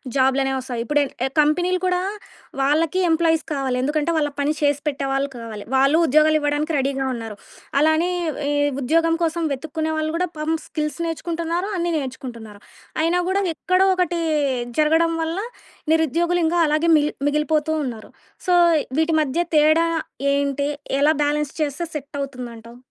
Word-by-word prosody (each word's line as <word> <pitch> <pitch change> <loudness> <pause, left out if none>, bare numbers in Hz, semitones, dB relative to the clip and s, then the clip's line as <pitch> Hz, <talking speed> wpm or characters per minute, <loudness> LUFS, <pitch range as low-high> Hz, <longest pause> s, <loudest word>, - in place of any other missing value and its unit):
జాబ్లనేవి 270 0 +2
వస్తాయి? 245 -3 -4
ఇప్పుడెన్ 290 0 +1 0.2
ఎ - - -6
కంపెనీలు 355 +5 +1
కూడా 360 -1 +1 0.6
వాళ్ళకి 310 +5 +2
ఎంప్లాయీస్ 325 -1 +2
కావాలి 265 -3 -1
ఎందుకంటే 300 +3 0
వాళ్ళ 295 -1 0
పని 285 +1 +1
చేసి 290 -1 +2
పెట్టేవాళ్ళు 275 0 -1
కావాలి. 225 -3 -7
వాళ్ళు 275 +4 +4
ఉద్యోగాలు 310 +2 +4
ఇవ్వడానికి 295 +2 -1
రెడీగా 270 0 -1
ఉన్నారు. 225 -3 -7 0.4
అలానే 315 +3 +3 0.4
ఈ - - 0 0.3
ఉద్యోగం 330 +5 +2
కోసం 335 +1 0
వెతుక్కునే 315 +3 -3
వాళ్ళు 310 0 -1
కూడా 360 0 -1
పాపం 310 +1 0
స్కిల్స్ 300 +1 -3
నేర్చుకుంటున్నారు 335 +2 -2
అన్నీ 345 0 -1
నేర్చుకుంటున్నారు. 235 -6 -8 0.4
అయినా 335 +2 +2
గూడా 385 +1 +1 0.2
ఎక్కడో 370 +3 +2
ఒకటి 355 -2 0 0.6
జరగడం 320 +2 +3
వల్ల 325 +3 -2 0.5
నిరుద్యోగులు 335 +2 +2
ఇంకా 335 +2 +1
అలాగే 305 +2 +1
మిగిల్ 295 0 +2
మిగిలిపోతూ 300 +1 +1
ఉన్నారు. 235 -5 -6 0.4
సో 360 - +2 0.5
వీటి 320 +1 +2
మధ్య 305 +4 0
తేడా 310 +2 +5 0.5
ఏంటి? 280 0 0 0.3
ఎలా 300 +2 +5
బ్యాలెన్స్ 295 -1 0
చేస్తే 300 +3 -1
సెటవుతుందంటావు? 255 -5 -7
300 Hz, 140 wpm, -22 LUFS, 275-330 Hz, 0.6 s, తేడా